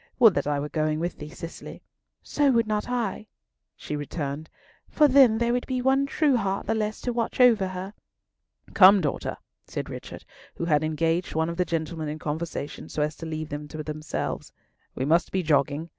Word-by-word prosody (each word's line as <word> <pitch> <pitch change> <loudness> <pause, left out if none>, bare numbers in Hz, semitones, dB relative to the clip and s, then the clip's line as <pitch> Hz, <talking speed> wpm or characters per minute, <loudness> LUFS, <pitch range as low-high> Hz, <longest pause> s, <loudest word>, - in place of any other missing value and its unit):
"Would 225 -5 +7
that - - -1
I 145 -1 0
were 145 - -3
going 155 0 0
with 175 +1 -3
thee, 150 - -7
Cicely!" 165 +2 -9 0.4
"So 290 -1 +2
would 230 -2 +3
not 215 +1 -2
I," 225 -4 -2 0.5
she 150 - -5
returned; 145 0 -4 0.4
"for 300 - +5
then 260 -5 +6
there 235 +1 +1
would 245 - -1
be 255 -1 -1
one 265 +2 +2
true 280 -2 +2
heart 195 -3 -2
the - - 0
less 215 -1 -2
to 245 - -2
watch 230 +1 -2
over 230 -6 +5
her." 185 +2 -6 0.8
"Come, 195 +1 +8
daughter!" 145 -4 -2 0.3
said - - -5
Richard, - - -8 0.3
who 170 - -3
had 150 -2 +2
engaged 165 +3 0
one 160 +1 +1
of 170 - -5
the 180 - +2
gentlemen 160 -1 -3
in 150 - -4
conversation 155 -1 -5
so 150 - -1
as 150 0 -2
to 165 - -7
leave 155 -1 -4
them 145 +1 -5
to 155 0 -6
themselves. 155 0 -4 0.4
"We 130 - -2
must 165 +3 +2
be 190 -1 0
jogging. 150 +1 +1
170 Hz, 195 wpm, -26 LUFS, 155-220 Hz, 0.8 s, Come